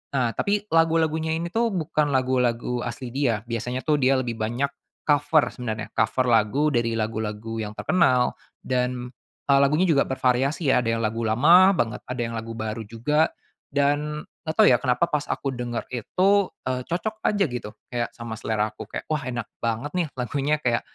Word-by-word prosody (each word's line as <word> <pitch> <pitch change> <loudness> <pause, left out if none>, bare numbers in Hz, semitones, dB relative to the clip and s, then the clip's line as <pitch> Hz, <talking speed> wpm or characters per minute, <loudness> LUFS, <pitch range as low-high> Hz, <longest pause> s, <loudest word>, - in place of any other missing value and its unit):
Nah 120 -4 +2
tapi 205 0 0
lagu-lagunya 160 -1 +2
ini 170 +1 -4
tuh 230 0 +2
bukan 155 -3 0
lagu-lagu 125 -2 +1
asli 120 +1 -5
dia, 120 -6 0
biasanya 125 +2 -3
tuh 150 -2 +2
dia 130 +1 +4
lebih 120 -2 -2
banyak 120 +6 -1 0.3
cover 150 +1 +3
sebenarnya, 110 -4 -5
cover 130 -1 +1
lagu 120 +7 +3
dari 115 -2 +1
lagu-lagu 110 0 -3
yang 105 0 -6
terkenal 130 -9 +3 0.3
dan, 125 -1 -1 0.3
eee, 140 -1 +4
lagunya 150 +6 +3
juga 150 -6 +3
bervariasi 135 +3 +1
ya - - +4
ada 115 - -2
yang 115 0 0
lagu 115 +2 -2
lama 170 - +6
banget 120 +1 -1
ada 125 -1 -3
yang 115 - -5
lagu 115 0 -5
baru 110 0 -3
juga 150 +9 +1 0.4
dan 145 +2 0 0.2
nggak 160 - -2
tau - - +7
ya 125 - +5
kenapa 125 +4 +2
pas 150 -3 -2
aku 135 -2 -2
denger 120 -1 -4
itu, 155 - +1 0.4
eee, 130 0 -1
cocok 210 +6 -2
aja 205 -1 +2
gitu. 125 -6 -5 0.2
Kayak 120 -1 -1
sama 115 -1 -6
selera 110 -1 -1
aku - - -9
kayak, - - -5
"Wah, 155 - +1
enak 120 -3 -3 0.2
banget 115 +5 -2
nih 180 -3 0
lagunya," 140 +4 0
kayak, 120 -1 +2
125 Hz, 180 wpm, -24 LUFS, 115-150 Hz, 0.4 s, tau